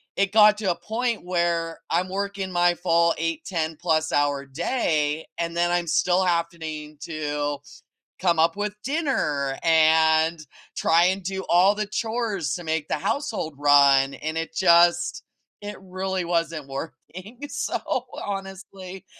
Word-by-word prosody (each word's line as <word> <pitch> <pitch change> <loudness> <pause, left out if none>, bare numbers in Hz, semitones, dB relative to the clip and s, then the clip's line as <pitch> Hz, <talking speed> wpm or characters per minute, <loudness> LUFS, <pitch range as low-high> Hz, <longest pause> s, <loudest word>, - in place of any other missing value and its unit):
it 195 0 +1
got 210 0 +6
to 200 -4 0
a - - -2
point 230 -1 -2
where 170 -2 -1
I'm 175 +3 +1
working 200 0 -4
my 175 0 +3
full 170 -1 +2
8, 165 -1 -2
ten-plus-hour 155 -4 0
day 155 - -1
and 170 0 -3
then 175 0 +2
I'm 175 -1 0
still 180 +3 +2
happening 165 -3 -3
to 145 -2 -3 0.6
come 175 -3 +2
up 165 +3 +2
with 205 0 -3
dinner 195 - -1
and 160 0 +3 0.3
try 165 +1 +3
and 190 +2 +1
do 190 +1 -4
all 180 +4 +5
the 215 0 -2
chores 215 - -2
to 175 - -7
make 160 -1 -2
the - - 0
household 160 - -3
run, 140 -1 +5
and 155 +1 -5
it 165 0 -3
just 175 0 +3 0.4
it 205 0 -7
really 190 0 -3
wasn't 165 -3 -2
working, 180 - -9
so, - - -2 0.5
honestly, 195 -1 -7
170 Hz, 140 wpm, -24 LUFS, 160-190 Hz, 0.6 s, got